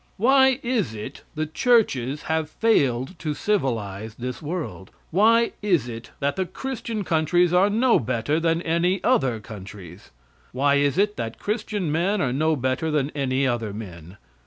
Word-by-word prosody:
Why 265 +3 +4
is 230 - -1
it 110 +6 -7
the 155 +1 -1
churches 150 - +1
have 160 -1 -1
failed 140 - +1
to 155 -3 -3
civilize 110 - -2
this 125 +4 -5
world? 155 - -5 0.2
Why 230 +6 +4
is 175 - +1
it 115 0 -8
that 140 0 -1
the 190 -1 -1
Christian 230 +1 -4
countries 170 +1 +2
are 185 +3 +5
no 230 +4 +3
better 125 +6 -1
than 165 +1 0
any 175 +3 +1
other 125 -4 +2
countries? 100 -4 -11 0.4
Why 140 +2 +3
is 140 +2 +1
it 205 +1 +1
that 115 -1 -4
Christian 210 -5 -2
men 185 +7 +1
are 130 -7 0
no 155 +3 +2
better 130 +4 -1
than 150 -2 0
any 135 -1 0
other 115 -5 -1
men? 90 -4 -9
150 Hz, 160 wpm, -24 LUFS, 125-195 Hz, 0.4 s, are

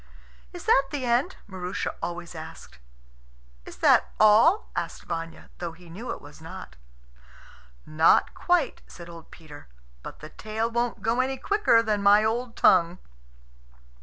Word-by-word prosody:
"Is - - -9
that 275 - +4
the 275 -3 -4
end?" 245 +10 +1
Maroosia 185 -1 -4
always 175 0 -5
asked. 160 - -11 0.9
"Is - - -10
that - - +4
all?" 220 - +5
asked - - -4
Vanya, 165 0 -7
though 170 -2 -5
he 170 0 -16
knew 220 +9 -8
it - - -6
was 145 +2 -14
not. 160 - -10 1.1
"Not 155 +1 +3
quite," 350 -7 0
said 170 -1 -12
old 165 -1 -12
Peter; 150 - -14 0.3
"but - - -10
the 155 - -10
tale 220 +5 -4
won't 235 +1 -2
go 230 +2 0
any 265 +1 0
quicker 330 - +2
than 210 -2 -1
my 205 +1 +5
old 230 +2 -2
tongue." 175 -1 +4
210 Hz, 145 wpm, -26 LUFS, 165-240 Hz, 1.1 s, all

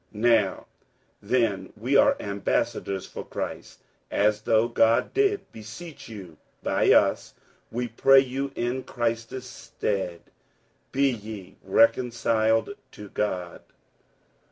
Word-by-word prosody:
47:005:020 105 - -6
Now 110 -5 +3 0.6
then 100 -4 0
we 125 +6 -1
are - - +5
ambassadors 100 -1 -2
for - - -8
Christ, - - -6 0.3
as 105 +1 +2
though 110 +1 +3
God 115 -1 +2
did 405 0 +1
beseech 120 +8 -10
you 95 -8 -10 0.3
by - - +2
us: - - +3 0.4
we 120 +1 -2
pray 135 +4 +5
you 135 +1 -3
in 120 +2 -1
Christ's 115 +1 -3
stead, 100 -8 -4 0.7
be 140 +1 +3
ye 105 -4 -8
reconciled 115 - +2 0.2
to 105 -1 -10
God. 90 -5 -3
115 Hz, 110 wpm, -26 LUFS, 105-125 Hz, 0.7 s, are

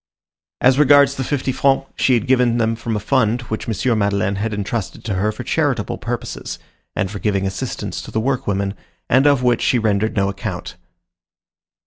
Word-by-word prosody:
As 130 +2 +4
regards 145 -1 +6
the 135 - -3
fifty 135 0 -1
francs, 135 +1 +2
she 130 - +3
had 115 - 0
given 125 -2 +3
them 115 -1 +1
from 115 0 -3
a - - 0
fund 120 +1 +1
which 110 - -4
M. 110 +2 0
Madeleine 100 -1 0
had 110 +2 -2
intrusted 105 -1 -4
to 110 - -2
her 100 +3 0
for 110 - -7
charitable - - -1
purposes, - - -5 0.4
and 95 -3 -1
for 105 - -5
giving 100 -2 0
assistance 95 -1 -4
to - - -10
the 110 - -1
workwomen, 100 -6 -1 0.4
and 130 +4 +5
of 140 -3 +3
which 120 -1 +2
she 125 - +3
rendered 110 0 0
no 100 -2 +2
account. 100 0 -5
110 Hz, 180 wpm, -20 LUFS, 100-130 Hz, 0.4 s, regards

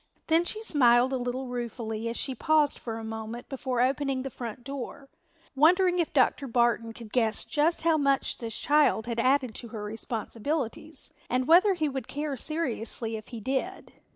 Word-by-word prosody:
Then 325 +2 +3
she 435 +4 -2
smiled 250 - +4
a - - +1
little 250 +1 -3
ruefully 230 -2 -4
as 230 - -4
she 265 - 0
paused 300 +3 +2
for 225 -2 -5
a 225 - -7
moment 220 +1 -6
before 260 -2 -2
opening 270 0 0
the 270 - -5
front 240 0 -7
door, 275 +1 -7 0.5
wondering 355 +5 +4
if 335 - 0
Dr. 275 0 +2
Barton 235 -1 +1
could 225 -1 -12
guess 225 -3 +1
just 315 +2 +1
how 325 -1 +4
much 275 -2 +1
this 225 -2 -3
child 295 -7 +3
had 235 -1 -3
added 255 -1 +2
to 235 - -7
her 215 -2 -7
responsibilities 230 +8 -4 0.2
and 255 +1 +1
whether 370 +4 +6
he 315 -3 0
would 265 -4 -4
care 290 0 -3
seriously 235 -6 -3
if 215 -1 -8
he 235 - -7
did. 270 - -3
255 Hz, 180 wpm, -28 LUFS, 230-295 Hz, 0.5 s, whether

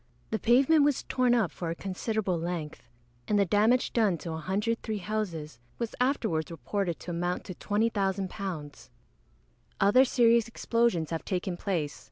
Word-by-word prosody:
The 220 - 0
pavement 270 +6 +5
was 290 -2 +2
torn 250 -1 +2
up 220 -7 +1
for 170 - -5
a 165 - -2
considerable 195 0 -2
length, 160 -7 -5 0.4
and 210 - +2
the 200 - +4
damage 215 +7 +2
done 210 -7 +2
to 165 +2 -6
103 210 +7 -2
houses 175 - -4 0.2
was 235 -2 -3
afterwards 220 - 0
reported 170 - -3
to 180 - -6
amount 175 +1 -2
to 185 - -7
£20,000. 195 -6 -2 0.9
Other 205 +7 +6
serious 235 -3 +4
explosions 230 -8 0
have 165 - -3
taken 185 -1 -2
place. 175 -6 -2
200 Hz, 145 wpm, -29 LUFS, 170-230 Hz, 0.9 s, Other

